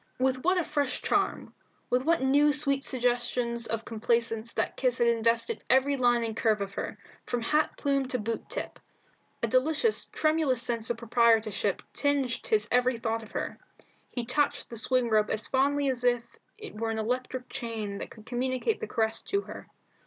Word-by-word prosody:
With 260 0 0
what 365 +2 +3
a 355 - +2
fresh 285 -4 -1
charm, - - 0 0.4
with 250 - +3
what 325 0 +2
new 290 +3 +4
sweet 275 -2 0
suggestions 240 -2 0
of 225 0 -3
complaisance 230 0 -1
that - - -1
kiss 250 -2 +1
had 240 - +3
invested 235 - +1
every 265 +2 +4
line 240 -2 +3
and 225 -1 -3
curve 220 -2 +2
of 200 0 -4
her, - - -4 0.3
from 240 -2 -2
hat 300 +5 +1
plume 275 -2 0
to 255 - 0
boot 225 0 -4
tip! - - -4 0.6
A - - +3
delicious 310 - +2
tremulous 310 -5 +1
sense 235 -2 -1
of 240 - -1
proprietorship 225 -4 +2
tinged 280 -4 0
his 210 -1 +2
every 250 0 +3
thought 225 0 -2
of 220 - -13
her. - - -4 0.5
He 245 -2 -4
touched 270 +3 0
the - - -5
swing 255 +2 +1
rope 215 -2 +2
as 215 0 0
fondly 280 +2 +2
as 255 -2 -1
if 245 -1 +3 0.3
it 430 0 -9
were 225 +1 -2
an 225 - -2
electric 250 +3 -2
chain 220 -4 -4
that - - -6
could 220 -2 -14
communicate 255 - -1
the 445 - -4
caress 220 -1 0
to 400 0 0
her. - - -10
245 Hz, 180 wpm, -28 LUFS, 230-270 Hz, 0.6 s, new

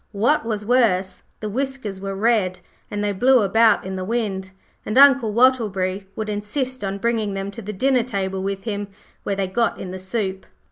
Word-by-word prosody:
What 225 +6 +2
was 210 -2 -2
worse, 195 -6 +2 0.2
the 215 - -3
whiskers 255 -5 -3
were 195 0 -4
red, 200 -3 +1 0.3
and 205 0 -3
they 205 - +1
blew 245 +4 +4
about 225 +2 +4
in 190 0 -4
the 185 - -3
wind, 195 -3 -2 0.3
and 215 - -2
Uncle 270 -5 +6
Wattleberry 205 -6 +2
would 220 - -4
insist 230 +5 -3
on 195 0 -2
bringing 220 -2 -1
them 195 +1 -4
to 230 - -9
the 210 0 -5
dinner 255 +5 +2
table 195 -5 -3
with 195 0 -3
him, 205 -2 -3 0.3
where 200 - -2
they 195 0 0
got 230 +5 0
in 180 - -6
the 185 - -6
soup. 190 0 -3
205 Hz, 190 wpm, -22 LUFS, 195-235 Hz, 0.3 s, Uncle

